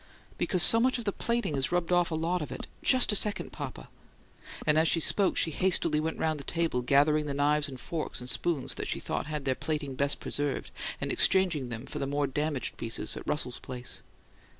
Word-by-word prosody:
"Because 180 -2 +3
so 230 - +9
much 255 +2 +2
of 235 - -6
the 200 - +1
plating 235 -6 -2
has 135 -1 -1
rubbed 175 -1 0
off 175 -1 +3
a 160 - -2
lot 170 +2 -1
of 150 - -6
it. - - -6 0.2
JUST 255 -4 +4
a - - 0
second, 210 0 0
papa." - - -7 0.8
And 150 0 +4
as 160 - +3
she 165 - +4
spoke 195 +4 +3
she 165 - +2
hastily 170 -2 +2
went 160 +1 -3
round 155 -2 -1
the - - -8
table, 165 -5 -1
gathering 145 +4 +3
the 140 - -3
knives 145 +1 +1
and 130 -2 -9
forks 160 +5 -4
and 125 - -8
spoons 155 0 -1
that - - -5
she - - -2
thought - - -3
had 150 -2 -4
their 130 - +2
plating 145 0 -4
best 140 +2 0
preserved, 145 -1 -3 0.3
and - - -2
exchanging 175 -9 +3
them 115 +2 -6
for - - -5
more 145 +1 0
damaged 145 0 -2
pieces 115 0 -3
at - - -9
Russell's 125 -5 -1
place. 125 -1 -7
150 Hz, 215 wpm, -29 LUFS, 140-175 Hz, 0.8 s, so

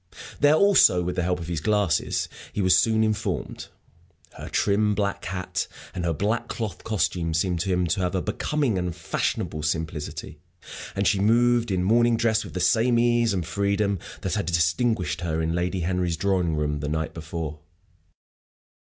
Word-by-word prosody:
There 145 +1 +5
also, 185 - +5
with 90 +1 -3
the 90 - 0
help 90 +1 0
of 85 - -7
his 85 -3 -3
glasses, 100 -3 +1 0.3
he - - -4
was 95 -1 +5
soon 110 +2 +3
informed. 105 -3 -2 0.7
Her - - -8
trim, 105 +1 +1
black 100 -1 -2
hat 90 0 -3 0.3
and 90 - -3
her 85 - +1
black 105 +8 -1
cloth 105 -6 -5
costume 90 -6 -1
seemed 90 +1 0
to 95 +4 -2
him 90 -1 +1
to 90 +4 -1
have 90 0 -1
a 95 - 0
becoming 120 0 -1
and 90 -2 -3
fashionable 85 -2 -2
simplicity; 75 0 -4 0.6
and 100 0 +1
she 100 - +2
moved 120 +3 +3
in 90 -2 0
morning 115 +3 +3
dress, 110 -1 +1
with - - -10
the - - -1
same 115 +7 +3
ease 120 -1 +3
and 90 -4 -1
freedom 100 +2 0 0.2
that - - -2
had - - -1
distinguished 90 +5 +1
her 80 -2 -2
in 80 0 -1
Lady 90 +2 -1
Henry's 90 -1 -1
drawing 90 -3 +1
room 75 -1 -1
the 75 0 -3
night 80 0 -2
before. 80 -1 -6
95 Hz, 175 wpm, -25 LUFS, 85-110 Hz, 0.7 s, There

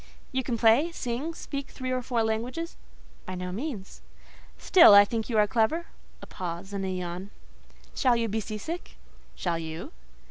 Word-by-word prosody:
"You 260 - 0
can 245 -2 -2
play, 235 +9 +4
sing, 280 +2 -3
speak 280 -4 -6
three 255 -1 -5
or 255 0 0
four 240 -2 0
languages?" 245 +10 -2 0.5
"By 185 - -4
no 180 0 -4
means." 215 -2 -6 0.6
"Still 345 - +8
I 205 0 +9
think 225 +2 -3
you 225 - 0
are 210 - +6
clever" 240 +11 +1 0.4
(a - - -6
pause 180 +2 -6
and 195 -1 -2
a 190 - -2
yawn). 180 +1 -4 0.6
"Shall 255 -3 +3
you 230 -1 0
be 220 +1 -1
sea 215 0 -5
sick?" 330 +11 -6 0.4
"Shall 170 -2 -1
you?" 160 0 -6
225 Hz, 175 wpm, -27 LUFS, 195-260 Hz, 0.6 s, I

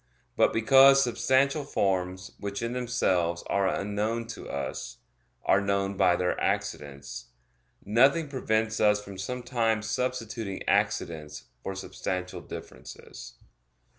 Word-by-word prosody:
But - - +4
because 135 +4 +6
substantial 135 +4 +2
forms, 95 -6 -1
which 100 +2 -4
in 115 +1 -2
themselves 95 -9 0
are 100 -1 +1
unknown 105 +4 -1
to 115 - -8
us, 70 - -5 0.5
are 95 - +4
known 100 0 0
by 90 -2 +4
their 90 0 -1
accidents; 75 -11 -3 0.6
nothing 135 +9 +4
prevents 110 -5 -1
us 105 -1 +4
from 100 -2 -10
sometimes 115 -1 -1
substituting 115 -4 -3
accidents 75 -3 -1 0.2
for 95 - -5
substantial 90 -1 -4
differences. - - -10
105 Hz, 110 wpm, -28 LUFS, 95-120 Hz, 0.6 s, because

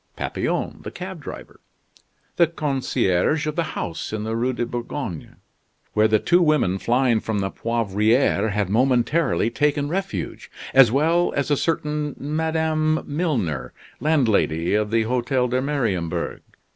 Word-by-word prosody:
Papillon, - - -2
the - - -6
cab - - -7
driver; - - -9 0.8
the 170 - +5
concierge 145 - 0
of 155 -1 -2
the 170 - +1 0.2
house 80 - -4
in 110 -1 -3
the 110 +1 -2
Rue 120 +3 0
de 120 -1 -2
Bourgogne 120 - -5 0.6
where 110 +1 +4
the 110 0 +4
two 175 - +3
women 150 - +2
flying 120 0 +2
from 110 0 -3
the 95 -1 -1
Poivriere 110 0 +1
had 105 -1 0
momentarily 125 - +2
taken 145 -1 0
refuge; 195 +3 -4 0.2
as 130 -4 +7
well 165 +6 +2
as 145 +1 -1
a - - +5
certain 150 -1 -1
Madame 155 +1 0
Milner, 140 - -2 0.3
landlady 110 - +2
of 105 0 +1
the 115 +1 +2
Hotel 125 +2 0
de 125 +1 0
Mariembourg. 115 - -2
125 Hz, 140 wpm, -23 LUFS, 110-150 Hz, 0.8 s, as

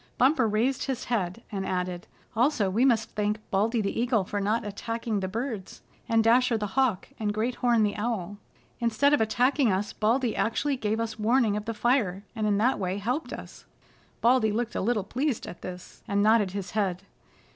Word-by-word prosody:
Bumper 260 -2 +4
raised 230 +5 0
his 265 -3 -3
head, 220 -2 -2
and 195 -2 -3
added: 180 -1 -3 0.3
"Also 230 -5 +2
we 225 +6 +2
must 225 -4 +2
thank 210 0 0
Baldy 220 +4 +2
the 200 +3 -1
Eagle 235 -4 +2
for 205 +2 -3
not 215 +3 0
attacking 230 +1 -3
the 190 - -2
birds, 220 -1 -5 0.3
and 225 -1 +4
Dasher 235 +1 +4
the 210 -2 -4
Hawk 260 -8 +1
and 210 -2 0
Great 230 +4 0
Horn 235 -3 +3
the 205 - 0
Owl. 205 -3 -3 0.4
Instead 235 +5 +2
of 295 - +3
attacking 245 +3 +2
us 195 +2 -1
Baldy 235 +2 +1
actually 275 +5 0
gave 220 -3 -1
us 225 -1 -3
warning 225 -1 +3
of 210 0 -3
the 230 -1 -3
fire, 210 -5 +1
and 215 -2 -1
in 205 -1 +2
that 245 +6 +2
way 185 0 -1
helped 250 +10 -2
us." - - -9 0.6
Baldy 235 -2 +4
looked 235 +2 -2
a - - -2
little 215 0 +1
pleased 255 +5 -2
at - - -9
this, 180 -1 -9
and 200 0 +1
nodded 215 -2 +4
his 195 -1 -5
head. 195 -3 -1
220 Hz, 190 wpm, -27 LUFS, 205-240 Hz, 0.6 s, Bumper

